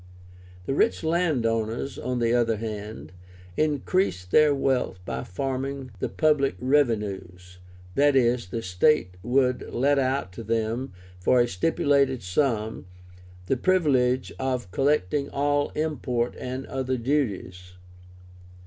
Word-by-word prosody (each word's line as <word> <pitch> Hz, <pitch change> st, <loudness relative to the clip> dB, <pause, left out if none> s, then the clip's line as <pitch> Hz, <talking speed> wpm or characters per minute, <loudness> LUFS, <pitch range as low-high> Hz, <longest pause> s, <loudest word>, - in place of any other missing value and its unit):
The 135 Hz, -, -1 dB
rich 220 Hz, +8 st, +1 dB
land 160 Hz, -6 st, +1 dB
owners, 115 Hz, +4 st, -2 dB
on 125 Hz, +1 st, -2 dB
the 120 Hz, -1 st, +1 dB
other 115 Hz, -2 st, +2 dB
hand, 105 Hz, 0 st, -6 dB, 0.4 s
increased 150 Hz, -, 0 dB
their 155 Hz, -1 st, +6 dB
wealth 135 Hz, -7 st, 0 dB
by -, -, -4 dB
"farming" 135 Hz, +5 st, -4 dB
the -, -, -2 dB
public 150 Hz, -3 st, +2 dB
revenues; 100 Hz, -9 st, -1 dB, 0.4 s
i.e. 135 Hz, -4 st, +4 dB
the 115 Hz, +4 st, -4 dB
state 90 Hz, +2 st, +2 dB
would 125 Hz, +3 st, +1 dB
let 140 Hz, +3 st, +2 dB
out 130 Hz, -7 st, 0 dB
to 115 Hz, +5 st, -8 dB
them, 115 Hz, +3 st, -1 dB, 0.3 s
for 125 Hz, +7 st, +3 dB
a 120 Hz, -, +4 dB
stipulated 140 Hz, -, +1 dB
sum, 110 Hz, 0 st, -1 dB, 0.6 s
the 135 Hz, -, +1 dB
privilege 130 Hz, -7 st, +2 dB
of 130 Hz, -7 st, -2 dB
collecting 140 Hz, 0 st, +1 dB
all 145 Hz, +1 st, 0 dB
import 135 Hz, -6 st, -1 dB
and 130 Hz, +1 st, -5 dB
other 130 Hz, -1 st, -2 dB
duties. 100 Hz, -9 st, -2 dB
130 Hz, 120 wpm, -25 LUFS, 110-140 Hz, 0.6 s, their